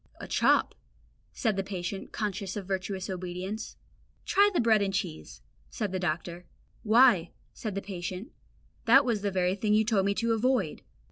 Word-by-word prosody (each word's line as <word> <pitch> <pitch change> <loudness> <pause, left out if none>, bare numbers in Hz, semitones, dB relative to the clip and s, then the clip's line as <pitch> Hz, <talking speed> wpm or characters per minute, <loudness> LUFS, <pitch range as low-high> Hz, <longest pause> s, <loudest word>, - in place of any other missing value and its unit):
"A - - -7
chop," - - +3 0.6
said 220 -6 -1
the 195 - 0
patient, 190 0 -5
conscious 200 -2 -3
of 200 - -5
virtuous 190 0 -3
obedience. 185 +3 -5 0.5
"Try 405 +1 +4
bread 225 -3 +4
and 195 -1 0
cheese," 180 -5 -5 0.3
said 210 -5 -3
the 190 - -2
doctor. 175 0 -3 0.3
"Why," 220 -6 +5 0.2
said 215 -4 -5
the 200 - -3
patient, 185 +2 -6 0.5
"that 270 +4 +6
was 230 -5 0
the 205 - 0
very 185 -1 +1
thing 210 +1 +1
you 220 0 +3
told 205 -4 +2
me 200 - +1
to 230 +1 +1
avoid." 225 -7 0
200 Hz, 160 wpm, -28 LUFS, 185-220 Hz, 0.6 s, that